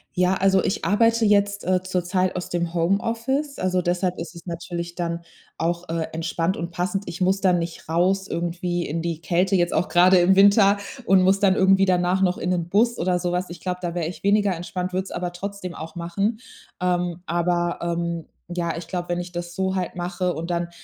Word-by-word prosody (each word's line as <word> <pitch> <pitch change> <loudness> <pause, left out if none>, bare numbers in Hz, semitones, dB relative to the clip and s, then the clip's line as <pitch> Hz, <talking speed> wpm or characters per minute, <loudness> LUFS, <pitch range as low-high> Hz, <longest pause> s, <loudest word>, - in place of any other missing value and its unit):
Ja, 180 +1 +3
also 190 0 +3
ich 195 - -1
arbeite 230 +2 +3
jetzt, 200 -1 +2
äh, 185 0 +1
zurzeit 185 0 0
aus 180 - -4
dem 170 -1 -2
Homeoffice. 230 - 0
Also, 185 -1 +1
deshalb 180 +1 0
ist 165 -1 -6
es 170 - -11
natürlich 170 0 -5
dann 170 -1 -3 0.4
auch, 170 +2 -2
äh, 165 -1 -2
entspannt 165 +2 -1
und 170 +1 -4
passend. 190 +3 -2
Ich 170 - -6
muss 190 +2 +2
dann 180 -2 +3
nicht 170 -2 -6
raus 185 +4 +1
irgendwie 175 0 -2
in 165 +3 -2
die 165 -2 -3
Kälte, 180 +3 +1
jetzt 175 -1 +2
auch - - +1
grade 180 +1 +5
im 180 +2 +5
Winter 200 0 +6 0.3
und 190 -1 +5
muss 190 +2 +4
dann 195 -2 +4
irgendwie 195 0 +4
danach 180 0 +2
noch 185 -1 +2
in 180 - -2
'nen 175 -2 -1
Bus 230 +5 +2
oder 180 0 +1
so 175 0 -1
was. 180 0 -2
Ich 175 - -8
glaube, 180 -1 -3
da 170 -1 -3
wäre 170 -3 -2
ich 175 - -8
weniger 200 -2 +3
entspannt, 180 +2 -4
würde 185 - 0
es 195 - -11
aber 175 0 -3
trotzdem 185 -1 -6
auch 160 +1 -8
machen. 195 +6 -1 0.4
Ähm, 175 -1 0
aber, 175 +1 0
ähm 170 -1 -2 0.3
ja, 175 -1 -2
ich 165 -1 -7
glaube, 175 0 -4
wenn 175 0 0
ich 175 0 -6
das 175 0 -5
so 190 +1 -1
halt 185 -2 -2
mache 180 0 -2
und 165 +3 -5
dann 170 0 -1
180 Hz, 215 wpm, -23 LUFS, 170-190 Hz, 0.4 s, Winter